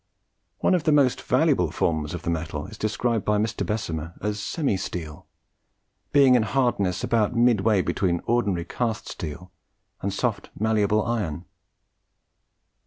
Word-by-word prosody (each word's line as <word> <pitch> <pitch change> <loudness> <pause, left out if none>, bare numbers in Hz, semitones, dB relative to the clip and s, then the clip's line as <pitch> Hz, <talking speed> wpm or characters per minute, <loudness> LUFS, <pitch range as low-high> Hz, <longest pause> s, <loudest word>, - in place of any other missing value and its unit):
One - - +3
of 175 -4 +1
the 155 - +4
most 140 -4 +3
valuable 130 - +2
forms 80 0 -1
of 85 - -7
the 85 - -1
metal 80 -2 -3
is 110 - -10
described 110 +1 -1
by 105 0 +1
Mr. 110 +1 -1
Bessemer 85 -6 -3
as 105 0 -2
"semi 140 - -1
steel," 80 -5 -6 0.8
being 140 -3 +6
in 125 - +5
hardness 110 -6 0
about 115 0 +1
midway 110 -4 +3
between 85 -2 0
ordinary 105 -8 +1
cast 115 +3 -2
steel 85 +2 -7 0.5
and 100 - -1
soft 110 +2 -2
malleable 110 -1 +2
iron. 95 -9 -2
105 Hz, 140 wpm, -25 LUFS, 85-120 Hz, 0.8 s, being